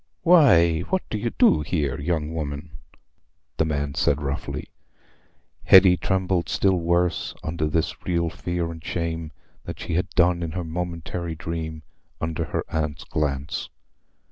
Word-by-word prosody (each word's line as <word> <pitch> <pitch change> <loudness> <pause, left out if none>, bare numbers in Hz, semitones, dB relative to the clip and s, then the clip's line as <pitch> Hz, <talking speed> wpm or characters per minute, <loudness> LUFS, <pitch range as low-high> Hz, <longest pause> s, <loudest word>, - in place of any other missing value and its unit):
"Why, 105 - +6
what 190 - -1
do 110 - -1
you 120 - -1
do 75 - +5
here, 75 -3 -1
young 80 +1 -1
woman?" 75 0 -4 0.9
the 80 - +2
man 70 -2 -2
said 70 +1 +2
roughly. 70 -1 -4 1.0
Hetty 95 -1 +8
trembled 95 -1 0
still 95 -2 +2
worse 85 +1 0
under 75 -1 -1
this 80 +1 -1
real 85 -2 0
fear 85 0 -3
and 80 -1 -10
shame 80 -2 -3 0.3
than - - -6
she - - -5
had 90 +2 0
done 85 0 +3
in 80 -2 -3
her 90 0 -3
momentary 85 0 -4
dream 80 -1 -5 0.4
under 80 0 -2
her - - -2
aunt's 80 0 -2
glance. 70 -3 -2
85 Hz, 145 wpm, -24 LUFS, 75-90 Hz, 1.0 s, Hetty